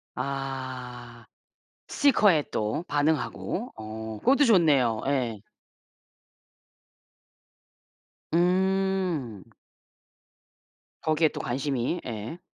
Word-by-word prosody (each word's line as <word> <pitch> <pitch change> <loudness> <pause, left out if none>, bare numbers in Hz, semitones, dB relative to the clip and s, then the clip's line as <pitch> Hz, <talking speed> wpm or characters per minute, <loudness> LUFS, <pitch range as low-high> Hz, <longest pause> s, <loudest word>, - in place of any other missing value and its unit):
아 130 -4 -5 0.6
스티커에 205 - +4
또 110 +9 -1
반응하고 155 - -1
어 110 0 -7
그것도 275 - +4
좋네요. 145 - +4
예. 120 -7 -1 2.9
음. 180 - +1 1.6
거기에 155 0 +3
또 - - -8
관심이. 135 +4 -1
예. 115 +8 -6
140 Hz, 130 characters per minute, -27 LUFS, 120-175 Hz, 2.9 s, 스티커에